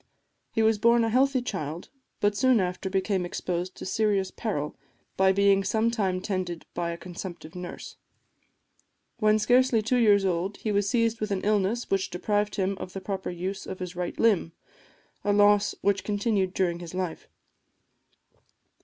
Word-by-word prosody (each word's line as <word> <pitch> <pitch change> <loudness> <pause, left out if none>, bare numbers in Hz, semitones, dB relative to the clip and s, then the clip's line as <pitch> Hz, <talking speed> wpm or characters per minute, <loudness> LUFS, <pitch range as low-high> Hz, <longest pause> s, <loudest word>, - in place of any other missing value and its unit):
He 225 - +1
was 220 -1 +3
born 235 +1 +4
a 225 - +1
healthy 260 +2 +2
child, 170 -7 -5 0.3
but 205 0 +2
soon 255 +1 +4
after 185 +1 -2
became 190 0 0
exposed 180 +1 -3
to - - -8
serious 200 -1 +1
peril 150 -10 -3 0.4
by 190 0 +4
being 200 0 +4
some 220 +4 +1
time 190 -5 -1
tended 185 -4 -3
by 170 -1 -2
a 170 - -4
consumptive 175 -2 -8
nurse. 180 -1 -8 1.2
When 215 -1 +4
scarcely 245 +1 +3
two 250 +4 +1
years 205 -4 +5
old 185 +2 -1
he 215 - -3
was 200 -1 +1
seized 230 -2 +1
with 215 - -1
an 195 -2 -1
illness 210 +3 0
which 195 -1 +1
deprived 205 +3 -1
him 195 -1 -1
of 185 0 -7
the 195 - -4
proper 190 0 -4
use 185 +3 -5
of 190 - -5
his 180 -1 -6
right 180 -1 -4
limb, 195 -7 +2 0.7
a 205 - +1
loss 205 0 +4
which 200 -1 +1
continued 205 -2 0
during 175 -2 0
his 175 0 -8
life. 185 -3 -4
195 Hz, 165 wpm, -27 LUFS, 185-215 Hz, 1.2 s, years